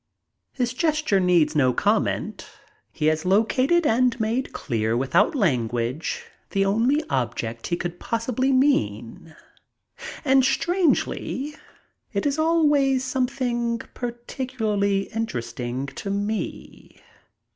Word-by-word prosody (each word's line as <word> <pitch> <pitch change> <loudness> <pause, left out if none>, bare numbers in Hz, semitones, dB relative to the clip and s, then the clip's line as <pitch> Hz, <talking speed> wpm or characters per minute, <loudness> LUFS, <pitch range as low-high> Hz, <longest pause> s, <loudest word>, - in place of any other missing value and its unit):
His 245 -2 -2
gesture 305 -7 +1
needs 170 -4 +3
no 130 -4 +3
comment. - - 0 0.4
He 150 - -3
has 155 0 +2
located 255 - +2
and 245 0 +2
made 225 +4 -1
clear 115 -3 -1
without 170 - +2
language 125 - -1 0.2
the 195 0 +1
only 225 +8 +2
one - - -15
object 120 -3 -2
he 170 - -1
could 175 0 -5
possibly 245 +3 -1
mean, 160 - 0 0.9
and, 265 -1 +5
strangely, 300 -1 0 0.6
it - - -1
is 290 +1 0
always 295 -5 +3
something 250 -3 -1 0.2
particularly 235 -5 -2
interesting 125 - -3
to 140 +8 -7
me. 205 +2 -4
220 Hz, 105 wpm, -24 LUFS, -, 0.9 s, and